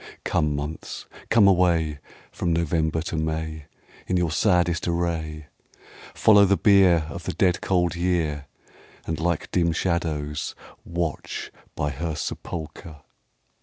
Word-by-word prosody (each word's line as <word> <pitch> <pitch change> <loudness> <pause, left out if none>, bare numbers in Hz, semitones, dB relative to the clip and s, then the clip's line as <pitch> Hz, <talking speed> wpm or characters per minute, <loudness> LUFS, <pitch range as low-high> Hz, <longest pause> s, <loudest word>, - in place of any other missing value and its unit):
Come, 75 -1 +1
months, 75 +2 -5 0.2
come 110 -3 +6
away, 85 -5 +3 0.3
From 85 - -1
November 80 -1 0
to 85 - -4
May, 80 -1 -3 0.4
In 90 - +1
your 85 -3 +1
saddest 85 -2 +2
array; 80 -3 -2 0.7
Follow 105 -2 +6
the 100 0 +4
bierOf 90 -6 +4
the - - -4
dead 90 -2 +2
cold 90 -3 +1
year, 85 -5 -1 0.6
And 80 -2 -3
like 85 -1 -1
dim 85 -2 +2
shadows 80 -4 -2 0.3
watch 85 -3 -4 0.2
by 75 0 -1
her 80 +1 -3
sepulchre. 80 -1 -6
85 Hz, 120 wpm, -24 LUFS, 80-90 Hz, 0.7 s, come